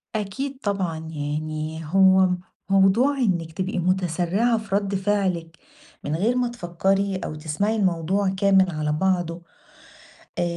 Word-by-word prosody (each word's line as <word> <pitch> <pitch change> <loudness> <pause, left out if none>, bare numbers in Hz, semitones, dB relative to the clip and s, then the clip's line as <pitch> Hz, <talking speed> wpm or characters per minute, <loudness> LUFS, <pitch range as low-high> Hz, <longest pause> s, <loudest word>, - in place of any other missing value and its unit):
أكيد 260 +7 -3
طبعًا، 190 -5 -1
يعني 155 0 -4
هو 190 +2 +5 0.4
موضوع 195 +9 +4
إنِك 175 -10 0
تبقي 185 0 -2
متسرعة 185 +5 +1
في 215 -3 -3
رد 200 -1 0
فعلِك 185 -4 -1 0.5
من 150 - -2
غير 220 +9 +1
ما 250 -1 +1
تفكري، 195 -1 -1
أو 155 -4 -5
تسمعي 160 +8 -1
الموضوع 190 0 +1
كامل 190 -1 +3
على 155 -1 -2
بعضه، 175 0 0 1.0
آآ، - - +2
190 Hz, 125 wpm, -23 LUFS, 165-200 Hz, 1.0 s, هو